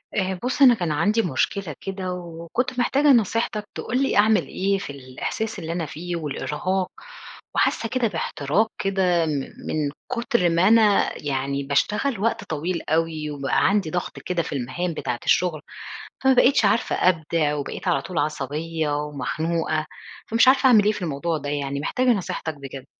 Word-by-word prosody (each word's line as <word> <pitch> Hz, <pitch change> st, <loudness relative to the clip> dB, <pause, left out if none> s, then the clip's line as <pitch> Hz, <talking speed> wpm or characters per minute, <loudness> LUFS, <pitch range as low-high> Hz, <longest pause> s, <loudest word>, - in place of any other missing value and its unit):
آآ 190 Hz, -2 st, -1 dB
بُصّ 250 Hz, +3 st, -2 dB
أنا 260 Hz, -3 st, +9 dB
كان 175 Hz, -8 st, -2 dB
عندي 210 Hz, +9 st, +2 dB
مشكلة 170 Hz, -, -1 dB
كده، 190 Hz, -1 st, -4 dB
وكنت 175 Hz, +9 st, -4 dB
محتاجة 275 Hz, +4 st, +2 dB
نصيحتك 225 Hz, -4 st, +2 dB
تقول 255 Hz, +3 st, -1 dB
لي 270 Hz, -, +1 dB
أعمل 210 Hz, -3 st, +4 dB
إيه، 195 Hz, +1 st, 0 dB
في 190 Hz, -, -7 dB
الإحساس 140 Hz, +11 st, -5 dB
اللي 165 Hz, -1 st, -5 dB
أنا 170 Hz, -1 st, -2 dB
فيه 175 Hz, +4 st, -5 dB
والإرهاق، 170 Hz, +4 st, -2 dB, 0.6 s
وحاسة 225 Hz, -, +1 dB
كده 250 Hz, 0 st, +1 dB
باحتراق 170 Hz, +1 st, 0 dB
كده 185 Hz, -3 st, +1 dB
من 150 Hz, -3 st, -1 dB, 0.3 s
من 150 Hz, -2 st, -1 dB, 0.2 s
كتر 235 Hz, -6 st, +1 dB
ما 170 Hz, +3 st, +3 dB
أنا 215 Hz, -2 st, +5 dB
يعني 140 Hz, 0 st, -1 dB
باشتغل 210 Hz, -, 0 dB
وقت 230 Hz, +3 st, 0 dB
طويل 165 Hz, +3 st, -3 dB
أوي، 160 Hz, -1 st, 0 dB
وبقى 140 Hz, -2 st, +1 dB
عندي 200 Hz, -5 st, +1 dB
ضغط 180 Hz, +2 st, -4 dB
كده 180 Hz, -2 st, -1 dB
في -, -, -6 dB
المهام 165 Hz, +7 st, -2 dB
بتاعة 120 Hz, -5 st, -3 dB
الشغل، 170 Hz, -4 st, +2 dB, 0.6 s
فما 265 Hz, -, +5 dB
بقيتش 255 Hz, -1 st, +4 dB
عارفة 215 Hz, +3 st, +2 dB
أبدع، 160 Hz, -3 st, +1 dB
وبقيت 145 Hz, +5 st, -4 dB
على 175 Hz, -, +2 dB
طول 180 Hz, -, -4 dB
عصبية 155 Hz, +2 st, -2 dB
ومخنوقة، 155 Hz, +2 st, -2 dB, 0.4 s
فمش 230 Hz, +3 st, +4 dB
عارفة 265 Hz, +1 st, +5 dB
أعمل 225 Hz, -5 st, +6 dB
إيه 210 Hz, -, +3 dB
في 205 Hz, -, -7 dB
الموضوع 160 Hz, 0 st, -2 dB
ده، 145 Hz, -1 st, -6 dB
يعني 140 Hz, -1 st, -2 dB
محتاجة 255 Hz, -, 0 dB
نصيحتك 180 Hz, -6 st, -1 dB
بجد. 135 Hz, -1 st, -9 dB
175 Hz, 160 wpm, -23 LUFS, 150-210 Hz, 0.6 s, أنا